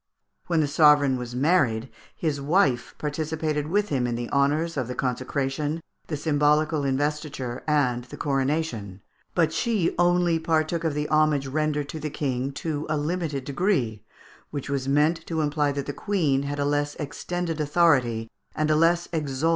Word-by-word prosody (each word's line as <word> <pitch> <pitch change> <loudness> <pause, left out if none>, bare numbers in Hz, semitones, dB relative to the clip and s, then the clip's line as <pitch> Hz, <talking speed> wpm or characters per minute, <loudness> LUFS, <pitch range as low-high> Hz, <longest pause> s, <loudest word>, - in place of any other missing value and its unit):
When 165 -2 +2
the 150 - +1
sovereign 145 -2 +5
was 125 -1 -5
married, 130 -5 +2 0.3
his 150 -4 -2
wife 140 -5 +1
participated 155 0 -2
with 205 +5 +1
him 130 -5 0
in 120 - -1
the 120 0 -4
honours 150 +4 +1
of 130 -5 -2
the 125 - -5
consecration, 135 +4 -2 0.3
the 155 - -3
symbolical 150 0 +2
investiture, 140 -2 -2
and 125 -5 +2
the 125 - -10
coronation; 135 -8 -1 0.3
but 165 -3 +2
she 220 -8 +1
only 175 -1 +3
partook 160 +1 0
of 160 -3 0
the 150 0 -1
homage 155 -2 +3
rendered 150 +1 -1
to 160 - -5
the 155 0 -3
King 135 -2 -2
to 150 0 -3
a 155 - +1
limited 150 -2 -2
degree, 135 - 0 0.5
which 140 -1 -5
was 135 -2 -1
meant 150 +4 +2
to 160 -2 -1
imply 145 -1 +1
that 140 -1 -3
the 145 - -4
Queen 160 -10 +1
had 145 - -3
a 145 - 0
less 145 0 0
extended 165 +2 -3
authority 140 -8 +2 0.3
and 155 0 +1
a - - +4
less 170 +2 +3
exalted 145 -5 -2
rank. 165 - +4
150 Hz, 170 wpm, -25 LUFS, 135-160 Hz, 0.5 s, sovereign